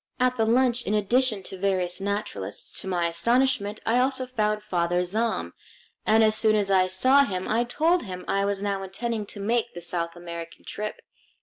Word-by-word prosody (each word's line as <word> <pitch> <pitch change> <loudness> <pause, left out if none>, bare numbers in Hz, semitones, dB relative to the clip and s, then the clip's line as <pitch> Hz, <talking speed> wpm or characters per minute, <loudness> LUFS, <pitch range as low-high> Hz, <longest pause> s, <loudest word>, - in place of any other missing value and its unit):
At 255 0 +2
the 225 -2 +1
lunch, 245 +1 +3
in 210 - +1
addition 215 0 +1
to 190 - -9
various 185 -2 0
naturalists, 200 - -4
to - - -8
my 175 -2 0
astonishment 215 +4 +1
I 235 +2 +3
also 260 0 0
found 215 -4 -1
Father 175 -3 0
Zahm; 220 +5 -1 0.6
and 220 +1 +5
as 215 0 +4
soon 215 0 +4
as 200 -2 +1
I 185 -1 +4
saw 255 +10 +5
him 185 -7 -3
I 235 +2 +1
told 325 +8 +2
him 185 -4 -7
I 195 - +1
was 200 0 -1
now 200 -1 -1
intending 210 +3 -4
to 205 - -9
make 225 +2 0
the - - -5
South 170 0 -2
American 170 -1 -8
trip. 210 0 -5
210 Hz, 190 wpm, -26 LUFS, 185-235 Hz, 0.6 s, and